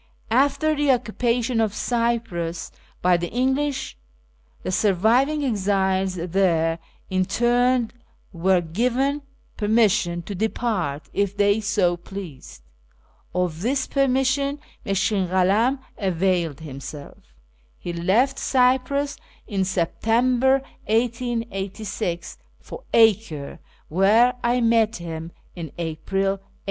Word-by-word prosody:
After 285 +5 +3
the 290 -1 +1
occupation 240 -1 0
of 215 -1 0
Cyprus 230 -9 -1 0.3
by 180 0 +5
the 175 0 -4
English, 265 +3 -1 0.7
the - - -2
surviving 225 - +2
exiles 190 -4 +1
there 170 -2 +1 0.3
interned 240 +5 +2 0.4
were 180 +1 +2
given 250 - 0 0.4
per 210 - -2
mission 195 -6 +2
to 205 - -6
depart 195 -7 -2
if 200 0 -1
they 205 +1 +3
so 200 -4 +1
pleased. 155 - -9 0.7
Of 175 -3 -1
this 260 +5 0
permission 275 +1 +1 0.2
Mushkin 195 0 0
Kalam 195 +9 +2 0.2
availed 180 - 0
himself 140 0 -9 0.6
He 175 - -6
left 225 +11 +2
Cyprus 265 +2 +1 0.3
in 195 -3 -1
September 240 +9 +2 0.2
1886 220 -6 -2 0.2
for - - -10
Acre 215 -10 +2 0.3
where 210 +8 +4
I 240 +1 +2
met 230 -1 +3
him 165 -1 -6 0.2
in 165 -5 -6
April 170 +4 -2
1890. 195 0 -2
205 Hz, 100 wpm, -23 LUFS, 180-245 Hz, 0.7 s, by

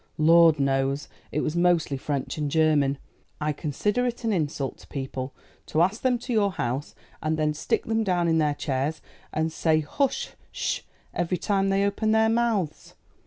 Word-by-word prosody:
"Lord 165 0 +6
knows. 135 +1 +1 0.2
It 150 - 0
was 155 - -2
mostly 175 -5 +2
French 140 +1 -3
and 150 -1 -1
German. 150 -3 +3 0.4
I 150 0 0
consider 200 - -1
it 240 0 -4
an 225 -2 +1
insult 145 -6 -2
to - - -16
people 130 -1 -5 0.3
to 160 +2 +3
ask 195 +5 0
them 255 -1 +2
to 245 +1 -4
your 200 -3 +2
house, 130 +2 -3 0.3
and 155 0 0
then 155 -1 +1
stick 150 - -1
them 225 0 +1
down 180 -4 +1
in 160 -1 +3
their 150 -2 +2
chairs, 145 +2 -2 0.3
and 160 +1 0
say 155 -2 +2 0.2
h 270 -1 +1 0.2
sh - - -1
h! - - -25 0.3
every 175 +1 0
time 195 +1 +1
they 195 +1 +2
open 215 +2 +1
their 220 0 +4
months. 225 -8 0
160 Hz, 180 wpm, -26 LUFS, 145-200 Hz, 0.4 s, Lord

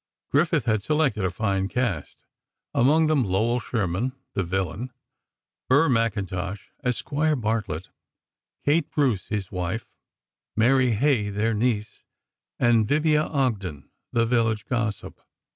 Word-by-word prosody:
Griffith 150 -2 +2
had 110 -3 +2
selected 140 -5 +1
a 95 - +2
fine 95 0 -1
cast, 110 - -3 0.5
among 150 +6 +4
them 155 -4 +3
Lowell 110 +5 +1
Sherman, 115 +2 -1 0.2
the 100 - 0
villain; 95 +7 -3 0.8
Burr 145 +5 +5
McIntosh, 100 -5 -1 0.3
as 125 -2 0
Squire 150 +1 0
Bartlett; 110 - -2 0.8
Kate 150 +1 +2
Bruce, 130 -10 +1
his 100 -3 -3
wife; 90 +4 -3 0.7
Mary 125 +2 +4
Hay, 110 -3 +2
their 105 +3 0
niece; 110 -1 -1 0.6
and 115 -3 +3
Vivia 150 +1 +3
Ogden, 105 - -2 0.2
the 115 -1 +2
village 115 -2 +1
gossip. 110 -4 -3
115 Hz, 120 wpm, -25 LUFS, 100-130 Hz, 0.8 s, Burr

